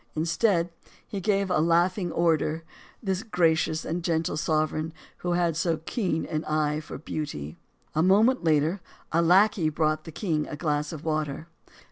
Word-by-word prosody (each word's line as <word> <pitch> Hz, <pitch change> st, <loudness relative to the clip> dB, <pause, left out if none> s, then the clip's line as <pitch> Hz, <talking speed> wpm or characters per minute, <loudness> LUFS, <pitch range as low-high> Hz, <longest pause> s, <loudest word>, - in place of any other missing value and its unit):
Instead, 170 Hz, +2 st, +1 dB, 0.4 s
he 200 Hz, -3 st, -4 dB
gave 195 Hz, -1 st, +1 dB
a 180 Hz, -, +3 dB
laughing 175 Hz, +3 st, +2 dB
order 165 Hz, -1 st, +1 dB, 0.4 s
this 190 Hz, -2 st, -1 dB
gracious 165 Hz, -6 st, +1 dB
and 170 Hz, +1 st, -3 dB
gentle 165 Hz, -2 st, 0 dB
sovereign 155 Hz, +1 st, 0 dB, 0.2 s
who 175 Hz, 0 st, -2 dB
had 175 Hz, -2 st, +1 dB
so 165 Hz, 0 st, +1 dB
keen 165 Hz, 0 st, -2 dB
an 155 Hz, 0 st, -3 dB
eye 155 Hz, -1 st, 0 dB
for 155 Hz, -, -8 dB
beauty. 135 Hz, -, -5 dB, 0.4 s
A 155 Hz, -, +2 dB
moment 210 Hz, +7 st, +4 dB
later 160 Hz, +3 st, +2 dB, 0.3 s
a 165 Hz, -, +3 dB
lackey 180 Hz, 0 st, +4 dB
brought 155 Hz, 0 st, 0 dB
the 160 Hz, -, -8 dB
king 155 Hz, -5 st, -1 dB
a -, -, -5 dB
glass 150 Hz, -1 st, -1 dB
of 155 Hz, -1 st, -8 dB
water. 155 Hz, 0 st, -2 dB
165 Hz, 155 wpm, -27 LUFS, 155-180 Hz, 0.4 s, moment